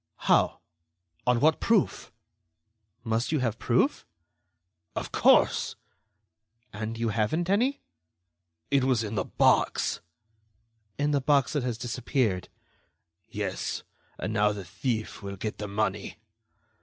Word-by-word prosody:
"How? -, -, +3 dB, 0.7 s
On 125 Hz, -1 st, +4 dB
what 155 Hz, +4 st, +4 dB
proof?" 225 Hz, -5 st, +1 dB, 0.9 s
"Must 115 Hz, +2 st, 0 dB
you 155 Hz, -, +2 dB
have 115 Hz, -5 st, -1 dB
proof?" -, -, +1 dB, 0.9 s
"Of -, -, -4 dB
course." -, -, +4 dB, 1.0 s
"And 110 Hz, +2 st, -4 dB
you 115 Hz, 0 st, 0 dB
haven't 135 Hz, -, 0 dB
any?" 250 Hz, +8 st, +1 dB, 0.9 s
"It 140 Hz, -2 st, +4 dB
was 130 Hz, -3 st, +2 dB
in 105 Hz, 0 st, -4 dB
the 95 Hz, -3 st, -1 dB
box." -, -, +2 dB, 1.0 s
"In 145 Hz, +1 st, +1 dB
the 140 Hz, -1 st, +2 dB
box 140 Hz, 0 st, +2 dB
that 145 Hz, -, +1 dB
has 120 Hz, -2 st, -2 dB
disappeared." 120 Hz, -5 st, -1 dB, 0.8 s
"Yes; -, -, -3 dB, 0.3 s
and 110 Hz, -, -3 dB
now 105 Hz, -1 st, +3 dB
the 100 Hz, -2 st, -7 dB
thief 110 Hz, +4 st, -3 dB
will 100 Hz, -1 st, -6 dB
get 105 Hz, +2 st, -5 dB
the 105 Hz, -, -4 dB
money." 105 Hz, +2 st, -2 dB
115 Hz, 120 wpm, -28 LUFS, 105-140 Hz, 1.0 s, On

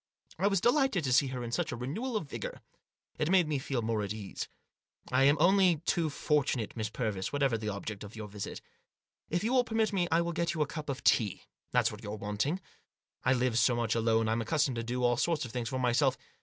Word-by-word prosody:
I 195 Hz, -, +3 dB
was 195 Hz, -2 st, +2 dB
delighted 245 Hz, -, +3 dB
to 130 Hz, -3 st, +1 dB
see 135 Hz, +2 st, +5 dB
in -, -, -7 dB
her 120 Hz, -2 st, -4 dB
such -, -, -1 dB
a -, -, -3 dB
renewal 210 Hz, -, -3 dB
of 160 Hz, -, -5 dB
vigour. -, -, -6 dB, 0.6 s
It 150 Hz, -, +1 dB
made 185 Hz, -3 st, +4 dB
me 150 Hz, -3 st, 0 dB
feel 130 Hz, -3 st, -2 dB
more 110 Hz, -1 st, 0 dB
at 100 Hz, -1 st, -3 dB
my 110 Hz, -, -3 dB
ease. 100 Hz, -3 st, -6 dB, 0.3 s
" -, -, -22 dB
I 130 Hz, +2 st, +4 dB
am 145 Hz, +2 st, +5 dB
only 185 Hz, +1 st, +5 dB
too 165 Hz, -2 st, +1 dB
fortunate, 140 Hz, -7 st, 0 dB
Miss 110 Hz, -2 st, -2 dB
Purvis, 105 Hz, -5 st, -2 dB
whatever 140 Hz, -4 st, +1 dB
the 110 Hz, -1 st, -3 dB
object 100 Hz, 0 st, -5 dB
of 105 Hz, +2 st, -10 dB
your 110 Hz, -1 st, -6 dB
visit. 105 Hz, -1 st, -6 dB, 0.7 s
If 175 Hz, +3 st, 0 dB
you 235 Hz, +4 st, 0 dB
will 255 Hz, -1 st, +5 dB
permit 225 Hz, -2 st, 0 dB
me 180 Hz, -3 st, +1 dB
I 165 Hz, +1 st, +4 dB
will 170 Hz, 0 st, -2 dB
get 170 Hz, 0 st, -1 dB
you 155 Hz, -, +2 dB
a -, -, -2 dB
cup 150 Hz, +1 st, -6 dB
of 135 Hz, -1 st, -4 dB
tea; 105 Hz, -6 st, +2 dB, 0.3 s
that's -, -, +3 dB
what 105 Hz, 0 st, -9 dB
you're 105 Hz, -1 st, -5 dB
wanting. 105 Hz, -, -1 dB, 0.6 s
I 130 Hz, -, +4 dB
live 125 Hz, -2 st, +1 dB
so 120 Hz, +2 st, +4 dB
much 115 Hz, -2 st, 0 dB
alone 115 Hz, -1 st, +2 dB
I'm 115 Hz, +1 st, +1 dB
accustomed 140 Hz, +1 st, +1 dB
to 115 Hz, -, -2 dB
do 125 Hz, +2 st, -2 dB
all 120 Hz, -1 st, +3 dB
sorts 165 Hz, -2 st, +1 dB
of 120 Hz, -, -8 dB
things 120 Hz, -2 st, -3 dB
for 130 Hz, -, -2 dB
myself. 130 Hz, +2 st, +2 dB
130 Hz, 240 wpm, -31 LUFS, 115-165 Hz, 0.7 s, see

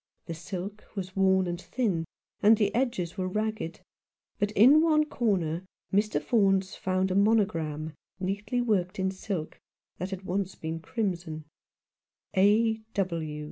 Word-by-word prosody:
The 165 Hz, -, -5 dB
silk 185 Hz, +5 st, -6 dB
was 190 Hz, -2 st, -5 dB
worn 190 Hz, -1 st, +4 dB
and 175 Hz, 0 st, -3 dB
thin, 195 Hz, -11 st, -1 dB, 0.4 s
and 215 Hz, +2 st, +6 dB
the 205 Hz, -2 st, +1 dB
edges 210 Hz, -8 st, -1 dB
were 185 Hz, -, 0 dB
ragged, 215 Hz, -3 st, -3 dB, 0.6 s
but 205 Hz, -, +1 dB
in 260 Hz, +9 st, +7 dB
one 310 Hz, -2 st, +4 dB
corner 185 Hz, -, 0 dB, 0.3 s
Mr. 210 Hz, +2 st, +2 dB
Faunce 195 Hz, -4 st, +2 dB
found 185 Hz, 0 st, 0 dB
a -, -, 0 dB
monogram 165 Hz, -8 st, +1 dB, 0.3 s
neatly 205 Hz, +6 st, -1 dB
worked 200 Hz, -5 st, 0 dB
in 190 Hz, 0 st, 0 dB
silk 185 Hz, -4 st, -5 dB, 0.4 s
that 185 Hz, +3 st, -3 dB
had 190 Hz, -1 st, -6 dB
once 190 Hz, 0 st, -2 dB
been 160 Hz, +1 st, -4 dB
crimson: 170 Hz, -6 st, -3 dB, 0.5 s
" -, -, -56 dB
A. 220 Hz, +3 st, +4 dB
195 Hz, 140 wpm, -28 LUFS, 180-215 Hz, 0.6 s, in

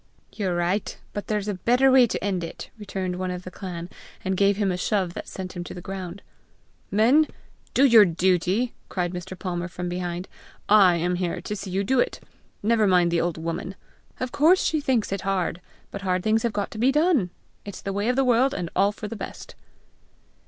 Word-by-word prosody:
"You're 190 Hz, -5 st, -1 dB
right; 175 Hz, +4 st, -1 dB, 0.2 s
but 205 Hz, -, -5 dB
there's 210 Hz, -1 st, -1 dB
a 205 Hz, -, 0 dB
better 245 Hz, +8 st, +3 dB
way 255 Hz, -2 st, +7 dB
to -, -, -3 dB
end 190 Hz, -3 st, -1 dB
it!" 165 Hz, -, -8 dB
returned 190 Hz, -3 st, -3 dB
one 185 Hz, 0 st, -2 dB
of 180 Hz, 0 st, -5 dB
the 185 Hz, -, -8 dB
clan, 175 Hz, -2 st, -6 dB, 0.4 s
and 190 Hz, 0 st, 0 dB
gave 200 Hz, +1 st, +3 dB
him 200 Hz, -3 st, +1 dB
a -, -, -1 dB
shove 180 Hz, -1 st, 0 dB
that -, -, -7 dB
sent 185 Hz, -1 st, -6 dB
him 175 Hz, -, -4 dB
to -, -, -8 dB
the -, -, -6 dB
ground. 185 Hz, +1 st, -7 dB, 0.7 s
"Men, 250 Hz, +10 st, +4 dB, 0.5 s
do 270 Hz, -, +6 dB
your 230 Hz, -5 st, +8 dB
duty!" 185 Hz, +6 st, +1 dB, 0.2 s
cried 180 Hz, -1 st, -2 dB
Mr. 180 Hz, +1 st, -6 dB
Palmer 175 Hz, -2 st, -3 dB
from 180 Hz, 0 st, -5 dB
behind. 180 Hz, 0 st, -4 dB, 0.4 s
"I 200 Hz, -4 st, +6 dB
am 175 Hz, +1 st, 0 dB
here 175 Hz, -1 st, -2 dB
to 210 Hz, +3 st, -4 dB
see 200 Hz, -1 st, -6 dB
you 190 Hz, +2 st, 0 dB
do 260 Hz, +6 st, +2 dB
it! -, -, 0 dB, 0.4 s
Never 220 Hz, -1 st, +3 dB
mind 180 Hz, -2 st, +4 dB
the 170 Hz, -, +2 dB
old 170 Hz, -1 st, -1 dB
woman! 165 Hz, +3 st, -4 dB, 0.4 s
Of 255 Hz, -1 st, -3 dB
course 335 Hz, +6 st, +4 dB
she 310 Hz, -2 st, +1 dB
thinks 250 Hz, -8 st, 0 dB
it 195 Hz, -1 st, -2 dB
hard; 185 Hz, -3 st, -1 dB, 0.3 s
but 200 Hz, -, -6 dB
hard 185 Hz, -2 st, 0 dB
things 220 Hz, +1 st, +2 dB
have 235 Hz, -, 0 dB
got 205 Hz, -1 st, -3 dB
to 215 Hz, -, -7 dB
be 255 Hz, +4 st, +4 dB
done! 300 Hz, -, +2 dB, 0.3 s
it's 205 Hz, -, -8 dB
the 195 Hz, -, -3 dB
way 205 Hz, +4 st, 0 dB
of 250 Hz, -, +2 dB
the 270 Hz, 0 st, +2 dB
world, 250 Hz, +3 st, +3 dB
and 175 Hz, -3 st, -4 dB
all 200 Hz, +2 st, +4 dB
for 210 Hz, 0 st, -7 dB
the 230 Hz, -, -6 dB
best." -, -, -8 dB
195 Hz, 215 wpm, -25 LUFS, 180-220 Hz, 0.7 s, your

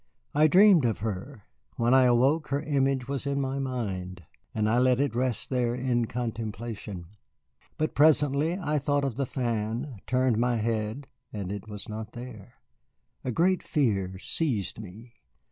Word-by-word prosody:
I 150 Hz, +2 st, +5 dB
dreamed 185 Hz, -1 st, +6 dB
of 115 Hz, -3 st, +1 dB
her. 105 Hz, +3 st, -5 dB, 0.3 s
When 120 Hz, +2 st, +2 dB
I 130 Hz, -1 st, +6 dB
awoke 135 Hz, +6 st, +3 dB
again 140 Hz, +1 st, 0 dB
her -, -, +1 dB
image 135 Hz, -2 st, +1 dB
was 140 Hz, 0 st, -3 dB
in 140 Hz, 0 st, 0 dB
my 135 Hz, 0 st, -2 dB
mind, 95 Hz, -9 st, -4 dB, 0.3 s
and 105 Hz, -1 st, 0 dB
I 115 Hz, +3 st, +3 dB
let 125 Hz, 0 st, +3 dB
it 140 Hz, -4 st, +1 dB
rest 125 Hz, +1 st, -1 dB
there 120 Hz, -2 st, +1 dB
in 125 Hz, -2 st, 0 dB
contemplation. 110 Hz, -5 st, -5 dB, 0.7 s
But 155 Hz, 0 st, -1 dB
presently 150 Hz, +2 st, +3 dB
I 150 Hz, -6 st, -1 dB
thought 145 Hz, 0 st, 0 dB
of 130 Hz, -5 st, -2 dB
the 135 Hz, 0 st, -2 dB
fan, 115 Hz, 0 st, -3 dB
turned 125 Hz, -3 st, +2 dB
my 120 Hz, 0 st, +2 dB
head, 110 Hz, +4 st, -2 dB, 0.2 s
and 100 Hz, -3 st, -5 dB
it 100 Hz, +1 st, -6 dB
was 105 Hz, -2 st, -6 dB
not 110 Hz, 0 st, -6 dB
there. 120 Hz, -4 st, -10 dB, 0.7 s
A -, -, -3 dB
great 180 Hz, +6 st, +2 dB
fear 100 Hz, -, 0 dB
seized 110 Hz, -, -2 dB
me. 110 Hz, +4 st, -11 dB
125 Hz, 160 wpm, -27 LUFS, 110-140 Hz, 0.7 s, dreamed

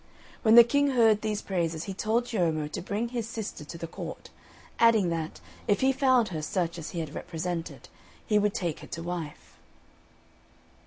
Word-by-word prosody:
When 220 Hz, -1 st, +5 dB
the 235 Hz, -, +12 dB
King 285 Hz, +4 st, +2 dB
heard 225 Hz, -5 st, +4 dB
these 215 Hz, -1 st, -2 dB
praises 170 Hz, -4 st, -1 dB
he 195 Hz, -, -5 dB
told 220 Hz, +5 st, 0 dB
Ciommo 165 Hz, -10 st, 0 dB
to -, -, -4 dB
bring 210 Hz, +6 st, -2 dB
his 235 Hz, -2 st, -3 dB
sister 220 Hz, -9 st, -5 dB
to 160 Hz, +3 st, -8 dB
the 165 Hz, -, -5 dB
court; 165 Hz, -, -8 dB, 0.5 s
adding 225 Hz, -6 st, +5 dB
that, 165 Hz, -1 st, -3 dB, 0.3 s
if 205 Hz, -, +2 dB
he 265 Hz, +1 st, +4 dB
found 260 Hz, -4 st, +3 dB
her 160 Hz, -4 st, -4 dB
such 170 Hz, +1 st, -2 dB
as 155 Hz, -, -6 dB
he 170 Hz, -, -3 dB
had 155 Hz, -2 st, -6 dB
represented, 170 Hz, -1 st, -5 dB, 0.4 s
he 210 Hz, -2 st, +3 dB
would 205 Hz, -1 st, +1 dB
take 170 Hz, -4 st, -2 dB
her -, -, -11 dB
to 165 Hz, -, -6 dB
wife. 170 Hz, -4 st, -6 dB
195 Hz, 180 wpm, -28 LUFS, 165-230 Hz, 0.5 s, the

